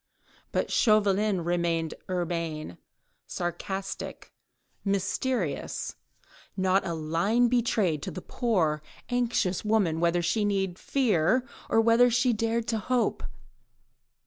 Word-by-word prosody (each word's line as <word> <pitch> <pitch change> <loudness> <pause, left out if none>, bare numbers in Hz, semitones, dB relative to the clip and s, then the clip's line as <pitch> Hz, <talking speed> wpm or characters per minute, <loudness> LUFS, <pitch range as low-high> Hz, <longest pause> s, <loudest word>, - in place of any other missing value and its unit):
But - - -1
Chauvelin 210 -4 +3
remained 170 -2 0 0.2
urbane, 165 - -3 0.5
sarcastic, 190 +3 -5 0.5
mysterious; 200 - -1 0.6
not 190 +1 +2
a 170 - -2
line 170 +10 +1
betrayed 220 - +1
to - - -4
the 185 - -7
poor, 170 - 0 0.3
anxious 240 -7 0
woman 205 -7 +2
whether 170 +1 +2
she 175 +6 +1
need 195 -3 -1
fear 250 - +2 0.2
or - - +4
whether 230 +2 +5
she 245 +1 +2
dared 230 +1 -1
to 225 -2 0
hope. 250 +3 0
195 Hz, 105 wpm, -28 LUFS, 170-230 Hz, 0.6 s, whether